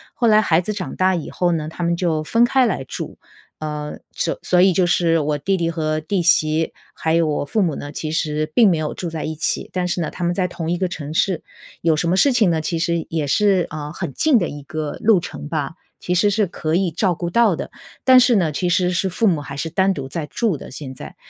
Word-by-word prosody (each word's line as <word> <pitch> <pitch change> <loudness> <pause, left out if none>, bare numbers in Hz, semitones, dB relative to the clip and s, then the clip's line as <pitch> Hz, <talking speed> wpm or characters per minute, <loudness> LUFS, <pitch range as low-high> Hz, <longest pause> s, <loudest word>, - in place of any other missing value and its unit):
后 235 - +1
来 215 0 +6
孩 170 -5 +3
子 210 +4 -3
长 195 -3 -5
大 185 0 +2
以 165 - -4
后 175 -1 0
呢， 155 -2 -2
他 160 +2 -6
们 170 0 +1
就 165 -3 0
分 230 +9 +2
开 260 +1 +3
来 190 - -1
住。 130 - -7 0.4
呃， 150 -1 -5 0.2
所 165 - -2
所 180 -1 +3
以 190 +1 +6
就 180 +1 +2
是 170 -1 +2
我 150 -1 0
弟 190 +6 0
弟 170 -1 0
和 155 -1 -1
弟 180 +4 -1
媳， 160 -1 +2 0.2
还 160 0 0
有 170 - +3
我 145 -1 -1
父 210 +8 0
母 165 -5 0
呢， 145 - -7
其 155 +1 -4
实 155 -1 -1
并 225 -4 +6
没 170 - +2
有 155 -1 -2
住 175 - -5
在 160 -2 -5
一 160 - -3
起。 155 - -2
但 180 -1 -1
是 175 - -2
呢， 160 - -2
他 180 - -6
们 175 - +1
在 185 -1 +1
同 170 -2 -5
一 175 - 0
个 185 0 0
城 150 -4 -6
市， 170 +2 +1 0.4
有 165 -1 +3
什 155 - -1
么 180 - +2
事 275 +8 +4
情 220 -7 +3
呢， 160 -1 0
其 165 +2 -2
实 170 0 -1
也 160 -2 -1
是， 195 +4 +2
呃， 150 -1 -5
很 140 - -5
近 295 - +3
的 175 - 0
一 145 - -7
个 150 +1 -5
路 215 -3 +5
程 160 -3 -7
吧， 150 -2 -2 0.3
其 180 - -2
实 185 +4 +3
是 210 +1 +2
可 160 -3 -2
以 180 -1 +1
照 175 +1 0
顾 175 0 -4
到 230 -5 +4
的。 - - -6 0.3
但 255 -1 +7
是 245 -1 +4
呢， 175 -6 +2
其 175 +4 -1
实 180 0 +2
是 185 +2 0
父 205 +6 0
母 170 -8 +2
还 140 -1 -8
是 165 +2 -3
单 190 +2 +2
独 140 -8 -4
在 150 +2 -5
住 215 - 0
的 - - -9
现 130 0 -8
在。 - - -10
170 Hz, 280 characters per minute, -20 LUFS, 155-190 Hz, 0.4 s, 但